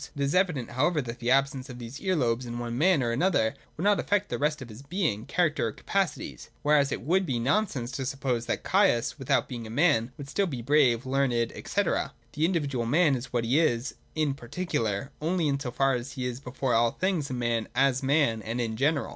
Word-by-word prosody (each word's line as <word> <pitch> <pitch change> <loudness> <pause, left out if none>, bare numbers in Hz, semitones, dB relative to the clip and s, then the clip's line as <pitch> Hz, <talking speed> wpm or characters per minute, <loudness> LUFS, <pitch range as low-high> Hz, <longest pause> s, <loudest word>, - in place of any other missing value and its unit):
It 140 - -4
is 140 - 0
evident, 180 -10 +1
however, 150 +5 +1
that 120 0 -7
the 120 0 -2
absence 135 0 +2
of 125 - -8
these 120 +3 -8
ear 190 -2 +1
lobes 120 -4 0
in 120 0 -5
one 120 -1 -4
man 160 +1 +3
or 120 - 0
another 125 -4 +2 0.2
would 165 - -4
not 205 0 +4
affect 205 0 0
the - - -3
rest 150 +1 +1
of 130 -3 -9
his 110 +3 -10
being, 140 - -2
character, 160 -8 +1
or - - -3
capacities: 195 - -3
whereas 145 -1 +3
it - - -2
would 185 +8 +2
be 135 -9 -1
nonsense 130 - 0
to 135 - -4
suppose 125 -3 -2
that - - -2
Caius, 120 +5 +2
without 135 - +1
being 120 -3 -6
a - - -9
man, 130 -3 +2
would 140 - -8
still 195 +7 0
be 130 -8 -5
brave, 130 -3 +3
learned, 130 -3 +1
&c. - - -1
The - - -1 0.3
individual 140 -9 -1
man 150 +2 +4
is 125 0 -6
what 120 -2 0
he 130 +7 +3
is 125 -5 +1 0.2
in 155 -3 +1
particular, 120 - -3
only 165 0 +1
in 140 -1 0
so 135 -3 -4
far 135 +2 +2
as 125 +2 -4
he 130 -2 -4
is 125 0 -3
before 130 -1 -2
all 115 +1 +4
things 185 -7 -1
a 130 - -3
man 120 -2 -1
as 135 0 +3
man 135 -5 +2
and 115 +3 -4
in 110 -2 -2
general. 140 -1 +1
135 Hz, 225 wpm, -28 LUFS, 120-155 Hz, 0.3 s, not